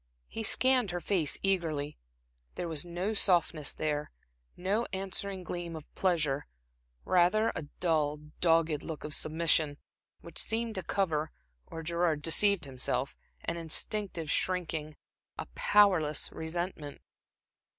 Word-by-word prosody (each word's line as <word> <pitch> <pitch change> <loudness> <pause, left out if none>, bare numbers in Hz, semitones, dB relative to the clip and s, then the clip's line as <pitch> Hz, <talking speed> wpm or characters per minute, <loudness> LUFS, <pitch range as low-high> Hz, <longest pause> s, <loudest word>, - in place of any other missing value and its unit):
He 225 - -6
scanned 255 0 +4
her 175 0 -2
face 170 -3 0
eagerly. 160 -7 -1 0.6
There 175 - -3
was 160 -3 -2
no 175 +5 -2
softness 175 -7 +2
there, 150 -1 -2 0.5
no 200 +6 0
answering 195 0 -2
gleam 175 -1 -5
of 155 -2 -10
pleasure; 155 -7 +1 0.6
rather 185 +5 +4
a 160 -3 -4
dull, 155 -4 +1 0.2
dogged 165 -3 +3
look 160 -2 -6
of 150 - -3
submission, 155 -2 +2 0.4
which 170 -1 -3
seemed 225 0 0
to 190 - -2
cover, 160 -4 0 0.4
or 165 - -7
Gerard 170 -2 0
deceived 200 +1 +2
himself, 130 0 -2 0.3
an 170 - -2
instinctive 170 0 0
shrinking, 160 -4 -1 0.4
a - - -4
powerless 180 - +3
resentment. 160 -2 -4
170 Hz, 120 wpm, -31 LUFS, 155-190 Hz, 0.6 s, scanned